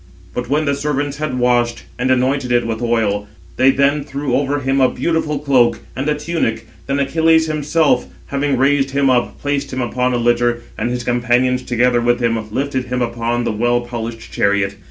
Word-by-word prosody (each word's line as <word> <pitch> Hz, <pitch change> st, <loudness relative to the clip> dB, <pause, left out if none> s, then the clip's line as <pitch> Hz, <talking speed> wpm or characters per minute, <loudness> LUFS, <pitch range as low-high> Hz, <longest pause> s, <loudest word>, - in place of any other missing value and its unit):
But 125 Hz, 0 st, -4 dB
when 150 Hz, +2 st, +1 dB
the 140 Hz, -, +1 dB
servants 145 Hz, 0 st, -2 dB
had 150 Hz, -4 st, -3 dB
washed 120 Hz, -1 st, +1 dB, 0.2 s
and 125 Hz, +1 st, 0 dB
anointed 130 Hz, 0 st, +1 dB
it 120 Hz, -1 st, +2 dB
with 115 Hz, 0 st, -3 dB
oil, 110 Hz, -4 st, 0 dB, 0.3 s
they 130 Hz, -, +5 dB
then 140 Hz, +2 st, +2 dB
threw 140 Hz, -2 st, -3 dB
over 145 Hz, +1 st, 0 dB
him 135 Hz, +1 st, +1 dB
a 130 Hz, -, +5 dB
beautiful 160 Hz, -3 st, -1 dB
cloak, 135 Hz, -4 st, +2 dB, 0.2 s
and 135 Hz, +5 st, -2 dB
a 150 Hz, -, +1 dB
tunic; 150 Hz, -8 st, -2 dB, 0.2 s
then 140 Hz, -, 0 dB
Achilles 160 Hz, +3 st, +3 dB
himself, 155 Hz, -3 st, +1 dB, 0.2 s
having 140 Hz, -1 st, -1 dB
raised 135 Hz, +1 st, +2 dB
him 135 Hz, 0 st, +2 dB
up, 125 Hz, -1 st, 0 dB
placed 145 Hz, -1 st, -2 dB
him 130 Hz, -, -4 dB
upon 125 Hz, 0 st, 0 dB
a -, -, +1 dB
litter, 120 Hz, 0 st, +1 dB
and -, -, -2 dB
his 125 Hz, 0 st, -3 dB
companions, 125 Hz, +1 st, +1 dB
together 120 Hz, 0 st, +1 dB
with 120 Hz, +1 st, +2 dB
[him], 115 Hz, -3 st, -1 dB
lifted 135 Hz, +1 st, -2 dB
him 125 Hz, 0 st, -1 dB
upon 120 Hz, 0 st, -1 dB
the -, -, -1 dB
well 120 Hz, +3 st, +1 dB
polished 115 Hz, -1 st, -6 dB
chariot. 100 Hz, -1 st, +1 dB
125 Hz, 190 wpm, -18 LUFS, 120-140 Hz, 0.3 s, they